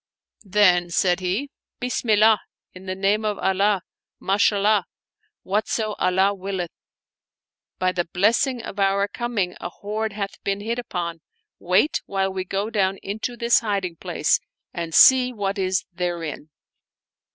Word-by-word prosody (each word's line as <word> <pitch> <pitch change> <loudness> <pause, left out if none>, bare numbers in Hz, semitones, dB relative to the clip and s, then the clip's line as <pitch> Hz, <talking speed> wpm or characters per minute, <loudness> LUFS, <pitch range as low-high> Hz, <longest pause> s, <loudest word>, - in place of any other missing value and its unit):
Then 180 -3 +4
said 175 +1 +2
he, 195 +10 -2
" - - -68
Bismillah; 220 -4 +3 0.3
in 185 +1 -12
the 185 - -2
name 200 +3 +1
of 210 -2 -1
Allah! 195 0 +1 0.4
Ma 195 +1 0
shallah; 205 -1 +3 0.6
whatso 215 +2 -1
Allah 190 +2 +3
willeth 190 -3 -4
I - - -70
By 185 0 +1
the 175 -1 -1
blessing 230 +6 +2
of 200 - -7
our 200 0 +2
com 240 +3 -5
ing 180 -3 0
a - - -4
hoard 215 +3 -4
hath 200 -1 -5
been 200 0 -1
hit 230 +3 -2
upon; 170 -7 -4 0.4
wait 185 - +2
while 195 -1 -1
we 185 -1 -3
go 200 +4 -2
down 195 -3 +1
into 220 +4 -4
this 235 +1 +4
hiding 195 -6 -2
place - - +1 0.3
and 165 -1 -4
see 255 -1 +7
what 200 -3 -3
is 185 -1 0
therein." 170 -4 -4
195 Hz, 150 wpm, -23 LUFS, 185-215 Hz, 0.6 s, see